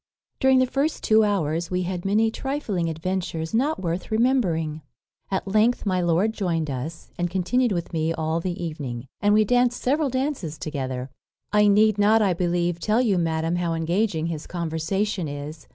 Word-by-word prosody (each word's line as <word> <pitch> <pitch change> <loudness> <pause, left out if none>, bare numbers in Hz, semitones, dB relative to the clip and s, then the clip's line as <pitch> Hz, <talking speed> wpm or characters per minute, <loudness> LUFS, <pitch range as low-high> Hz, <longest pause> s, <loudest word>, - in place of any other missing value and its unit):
During 265 0 +5
the 255 - +4
first 275 +5 -1
two 220 0 +5
hours 170 -5 0
we 180 0 -1
had 180 0 -4
many 220 +3 +2
trifling 225 - -2
adventures 165 0 -3
not 280 +8 +1
worth 175 0 -3
remembering. 185 - +1 0.5
At 195 0 -2
length 215 +5 +2
my 185 -2 +1
lord 175 +6 +2
joined 165 -8 -1
us, 145 +6 -6
and 175 0 0
continued 215 +7 +1
with 175 -2 -3
me 160 0 0
all 160 0 -1
the 175 0 -4
evening; 135 -7 -5 0.2
and 205 - +3
we 215 0 +4
danced 245 +2 +2
several 285 +3 +1
dances 260 - -2
together. 130 -3 -4 0.4
"I 210 0 +5
need 210 +1 +4
not, 215 +2 +5
I 190 -3 +2
believe, 175 0 0
tell 215 +6 +1
you, 210 -7 +2
madam, 165 0 0
how 170 -2 -1
engaging 165 +1 0
his 165 -2 -4
conversation 175 +3 -2
is. 145 +2 -7
180 Hz, 170 wpm, -24 LUFS, 165-215 Hz, 0.5 s, During